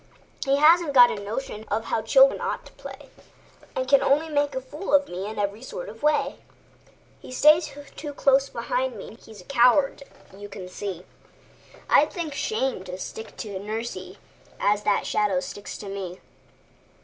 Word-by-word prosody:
He 275 Hz, 0 st, +2 dB
hasn't 315 Hz, +1 st, +5 dB
got 245 Hz, -2 st, +8 dB
a 200 Hz, -, -5 dB
notion 215 Hz, +1 st, -5 dB
of 220 Hz, +2 st, -1 dB
how 225 Hz, -, -1 dB
children 265 Hz, +5 st, +5 dB
ought -, -, -3 dB
to -, -, -14 dB
play, -, -, -11 dB, 0.7 s
And 260 Hz, -, -1 dB
can 275 Hz, +1 st, +5 dB
only 300 Hz, +4 st, +2 dB
make 290 Hz, -2 st, 0 dB
a -, -, 0 dB
fool 290 Hz, +5 st, -2 dB
of 285 Hz, 0 st, +3 dB
me 185 Hz, +3 st, -5 dB
in 215 Hz, -, -7 dB
every 205 Hz, +2 st, -2 dB
sort -, -, -7 dB
of -, -, -12 dB
way. 300 Hz, 0 st, +1 dB, 0.8 s
He -, -, -12 dB
stays 305 Hz, +5 st, +5 dB, 0.3 s
so 295 Hz, -1 st, -5 dB
close 275 Hz, 0 st, +3 dB
beside -, -, -2 dB
me, -, -, -10 dB
he's 220 Hz, -3 st, -13 dB
a -, -, -18 dB
coward 275 Hz, +2 st, +3 dB, 0.3 s
you 205 Hz, +1 st, -10 dB
can 190 Hz, -2 st, -8 dB
see; 185 Hz, -1 st, -6 dB, 0.8 s
I'd 300 Hz, +2 st, +4 dB
think 330 Hz, -5 st, -4 dB
shame 270 Hz, -, -2 dB
to 180 Hz, 0 st, -6 dB
stick 220 Hz, +3 st, -8 dB
to 200 Hz, -3 st, -5 dB
nursie 220 Hz, +4 st, -5 dB, 0.4 s
as 205 Hz, 0 st, +2 dB
that 205 Hz, -, +2 dB
shadow 205 Hz, -3 st, +1 dB
sticks 200 Hz, +2 st, -7 dB
to -, -, -9 dB
me! 190 Hz, -2 st, -6 dB
250 Hz, 175 wpm, -25 LUFS, 205-290 Hz, 0.8 s, got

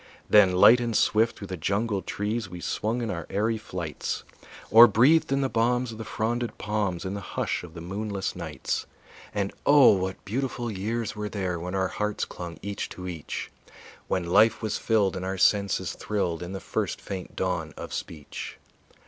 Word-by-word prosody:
Then 100 Hz, -3 st, +6 dB
light 115 Hz, +6 st, +7 dB
and 120 Hz, -2 st, -2 dB
swift 110 Hz, +2 st, +3 dB
through 100 Hz, -, -7 dB
the 95 Hz, -, -4 dB
jungle 100 Hz, +4 st, 0 dB
trees 105 Hz, +1 st, -3 dB
We 90 Hz, -1 st, -8 dB
swung 115 Hz, +7 st, -2 dB
in 110 Hz, -, -2 dB
our 85 Hz, -3 st, -5 dB
airy 110 Hz, +3 st, 0 dB
flights, 90 Hz, -7 st, -4 dB, 0.5 s
Or 115 Hz, +3 st, +10 dB
breathed 130 Hz, +10 st, +4 dB
in 135 Hz, 0 st, +2 dB
the 135 Hz, -, +2 dB
balms 120 Hz, +1 st, +1 dB
of 110 Hz, -, -9 dB
the -, -, -4 dB
fronded 120 Hz, +2 st, -2 dB
palms 105 Hz, -4 st, -2 dB
In 95 Hz, -, -3 dB
the 100 Hz, -, -4 dB
hush 90 Hz, -, -2 dB
of 85 Hz, -1 st, -11 dB
the 85 Hz, -, -7 dB
moonless 100 Hz, +2 st, -3 dB
nights; -, -, -3 dB, 0.4 s
And 100 Hz, -1 st, -2 dB
oh! 145 Hz, -3 st, +7 dB
what 95 Hz, 0 st, -2 dB
beautiful 120 Hz, +2 st, -2 dB
years 110 Hz, +3 st, -3 dB
were 105 Hz, 0 st, -4 dB
there 95 Hz, -5 st, -2 dB
When 90 Hz, +3 st, -4 dB
our 95 Hz, 0 st, +1 dB
hearts 105 Hz, 0 st, -2 dB
clung 85 Hz, -1 st, -8 dB
each 100 Hz, 0 st, -4 dB
to 90 Hz, 0 st, -7 dB
each; 85 Hz, -4 st, -5 dB, 0.6 s
When 90 Hz, -2 st, 0 dB
life 105 Hz, +6 st, +4 dB
was 110 Hz, -1 st, -1 dB
filled 105 Hz, -4 st, +2 dB
and 95 Hz, -, -4 dB
our 95 Hz, +1 st, -2 dB
senses 100 Hz, 0 st, +2 dB
thrilled 90 Hz, -6 st, -2 dB
In 90 Hz, +2 st, -6 dB
the 95 Hz, -, -4 dB
first -, -, -2 dB
faint 95 Hz, -2 st, -7 dB
dawn 90 Hz, -4 st, -1 dB
of -, -, -7 dB
speech. 75 Hz, -4 st, -6 dB
100 Hz, 185 wpm, -27 LUFS, 90-115 Hz, 0.6 s, Or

